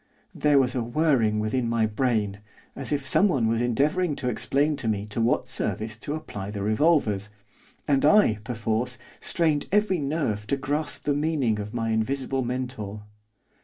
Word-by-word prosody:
There 150 -1 +3
was 130 -2 +3
a 125 - -1
whirring 120 -4 +2
within 115 +3 -1
my 115 -1 +2
brain, 110 -3 0 0.4
as 135 +1 -3
if 140 -2 -1
someone 140 - +3
was 115 +1 +1
endeavouring 145 +7 +1
to 125 -3 -2
explain 145 +4 +1
to 130 -5 -3
me 105 -2 -1
to 105 +2 -3
what 115 - +1
service 110 0 -1
to 145 +6 -4
apply 105 -11 -6
the 105 -1 -4
revolvers, 110 - +2 0.6
and 140 -2 +2
I, 150 - +5
perforce, 120 +1 -2 0.2
strained 160 -4 0
every 210 -3 +2
nerve 140 -8 -2
to 140 - 0
grasp 145 +3 -3
the 145 - +1
meaning 145 -7 0
of 105 +2 -6
my 115 -1 -1
invisible 130 +4 -1
mentor. 120 -5 -4
125 Hz, 165 wpm, -26 LUFS, 110-145 Hz, 0.6 s, I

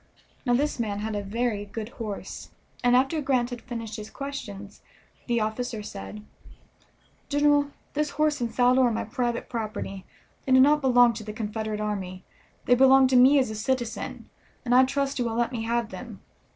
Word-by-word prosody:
Now 245 - +4
this 290 +1 0
man 210 -3 -1
had 220 0 -3
a 205 - -1
very 215 +1 -2
good 215 +2 -6
horse, 215 -5 -7 0.3
and 245 0 +4
after 270 +5 +2
Grant 255 -3 +1
had 245 -1 -6
finished 230 -3 -6
his 215 0 -8
questions 205 -8 -7 0.5
the 240 -1 +1
officer 220 +1 -3
said: 210 +1 -8 1.0
"General, 290 0 +3 0.2
this 300 0 0
horse 300 -2 0
and 235 -1 -1
saddle 250 +1 +4
are 245 - +4
my 225 - -2
private 240 +2 -2
property; 215 -4 -5 0.4
they 260 - +3
do 260 - +7
not 295 +3 +5
belong 245 -3 +5
to 220 0 -7
the 210 0 -7
Confederate 215 0 -4
army; 190 -3 -4 0.4
they 245 - +4
belong 265 +1 +6
to 260 - +2
me 260 +3 +7
as 255 -5 +2
a - - -5
citizen, 240 +1 -3 0.4
and 245 - +1
I 255 +1 +7
trust 275 0 -1
you 245 - +1
will 225 -1 -2
let 235 +1 0
me 225 -3 -4
have 235 -1 0
them. - - -9
240 Hz, 185 wpm, -26 LUFS, 215-260 Hz, 1.0 s, do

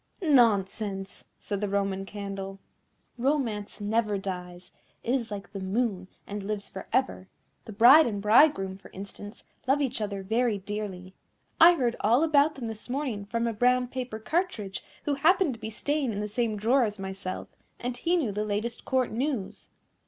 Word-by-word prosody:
"Nonsense!" 205 - +2
said 200 -1 -4
the 205 - -1
Roman 195 -1 -1
Candle, 195 -1 -6 0.6
"Romance 235 -7 -1
never 210 0 0
dies. 180 -2 -6 0.3
It 240 - 0
is 245 -4 -1
like 200 -2 -7
the 200 - -6
moon, 190 -1 -1 0.2
and 205 0 -5
lives 200 0 -4
for 190 - -8
ever. 260 -7 0 0.4
The - - -8
bride 245 +9 +8
and 205 -3 -2
bridegroom, 210 -3 +4
for - - -14
instance, 205 +2 -9 0.2
love 270 +2 +3
each 260 -5 -1
other 200 -2 -3
very 225 +2 +1
dearly. 195 -2 -6 0.5
I 345 +2 +9
heard 240 -6 0
all 240 +8 +3
about 305 -1 +4
them 260 -4 -6
this 225 +1 -7
morning 250 -7 -2
from 230 +3 -1
a 230 - 0
brown 250 +2 +2
paper 250 -3 -4
cartridge, 220 - -2 0.2
who 290 - 0
happened 320 +2 +3
to 230 - -11
be 220 0 -5
staying 285 +4 -1
in 205 - -4
the 210 - -2
same 215 0 -1
drawer 245 +6 +3
as 210 -2 -2
myself, 190 -1 -5 0.3
and 245 0 -3
he 335 +8 +1
knew 290 -12 0
the 210 +1 -2
latest 215 +3 -3
Court 260 -2 +1
news." 245 -4 -3
215 Hz, 175 wpm, -28 LUFS, 200-255 Hz, 0.6 s, I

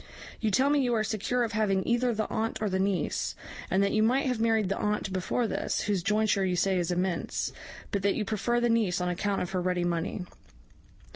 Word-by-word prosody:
You 220 - +1
tell 265 +7 +3
me 295 - +3
you 245 -2 +1
are 215 - +1
secure 220 +4 0
of 225 - -2
having 200 -3 +1
either 240 +1 +2
the 215 -1 -1
aunt 225 +1 -2
or 215 -2 -1
the 190 - 0
niece, 190 -4 -1 0.3
and 190 +2 +3
that 200 - +1
you 215 - +2
might 250 +6 +3
have 250 -3 0
married 225 -3 +2
the 195 - -1
aunt 210 -2 -1
before 190 +6 0
this, - - -1
whose 200 -3 0
jointure 210 +1 +2
you 185 -1 +1
say 185 +1 +2
is 175 - -1
immense, 180 0 -1 0.4
but 200 - 0
that 200 +1 +2
you 210 - -1
prefer 230 +4 0
the 240 - +2
niece 220 -6 +2
on 180 0 -1
account 195 +3 -1
of 180 - -6
her 185 -1 -1
ready 180 0 0
money. 175 +2 -2
205 Hz, 225 wpm, -28 LUFS, 185-225 Hz, 0.4 s, tell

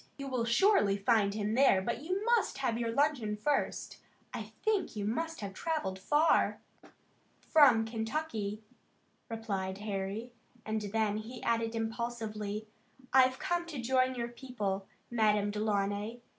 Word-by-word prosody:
You 275 - -6
will 250 -3 -1
surely 235 - +4
find 205 -1 +2
him 210 0 -1
there, 255 -5 +5
but 235 +5 -3
you 370 +7 -2
must 470 -3 +2
have 260 -4 0
your 230 -1 -1
luncheon 255 -5 +1
first. 285 +6 -1 0.3
I - - -6
think 430 - +1
you 205 -1 -2
must 325 +8 -2
have 200 -1 -5
travelled 245 - -2
far." 295 +11 +3 0.8
"From 260 -8 +5
Kentucky," 220 -2 -3 0.7
replied 200 -4 -3
Harry, 205 +3 -4 0.3
and 220 0 -1
then 210 0 0
he 230 +3 -7
added 230 0 0
impulsively: 225 -2 -3 0.5
"I've 260 0 +5
come 350 -2 -1
to 305 -6 -5
join 255 +1 +2
your 235 -1 -3
people, 210 -6 -4 0.2
Madame 210 -3 +2
Delaunay. 210 +2 -1
225 Hz, 135 wpm, -32 LUFS, 210-265 Hz, 0.8 s, there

